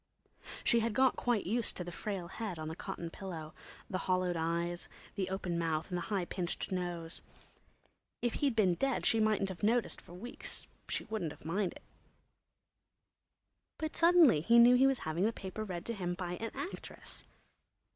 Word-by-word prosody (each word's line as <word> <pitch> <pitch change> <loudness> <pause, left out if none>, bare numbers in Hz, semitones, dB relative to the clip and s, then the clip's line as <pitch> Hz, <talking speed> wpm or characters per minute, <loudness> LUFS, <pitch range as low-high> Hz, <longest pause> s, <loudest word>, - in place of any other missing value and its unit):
She 235 - +4
had 230 -1 0
got 265 0 +5
quite 240 -4 +1
used 230 +4 +1
to 180 - -1
the 175 - -6
frail 190 -1 -4
head 200 -1 -4
on 155 0 -4
the 160 - -5
cotton 170 0 -5
pillow, 165 -5 -6 0.3
the 185 - -2
hollowed 185 -1 +1
eyes, 170 +1 -1 0.2
the 190 -1 -2
open 185 -3 -2
mouth 160 0 0
and 180 - -1
the 170 - -6
high 195 -4 +1
pinched 175 +1 -3
nose. 175 -2 -3 1.0
If 240 -1 0
he'd 275 -5 +2
been 195 -5 +4
dead 270 +8 0
she 225 - +4
mightn't 215 -2 +2
have 185 - -7
noticed 230 +3 +1
for 175 - -13
weeks; 230 +7 -4 0.2
she - - -1
wouldn't 210 -9 -3
have - - -18
minded. 180 +2 -1 2.0
But 315 -1 -3
suddenly 335 - +6
he 235 +8 +5
knew 240 +1 +9
he 260 +2 +6
was 270 -1 +3
having 160 +3 0
the 220 - +3
paper 210 0 -5
read 180 -5 -5
to 235 - -2
him 175 -4 -2
by 180 -1 -4
an 225 - -3
actress! 380 - -6
190 Hz, 175 wpm, -34 LUFS, 175-230 Hz, 2.0 s, knew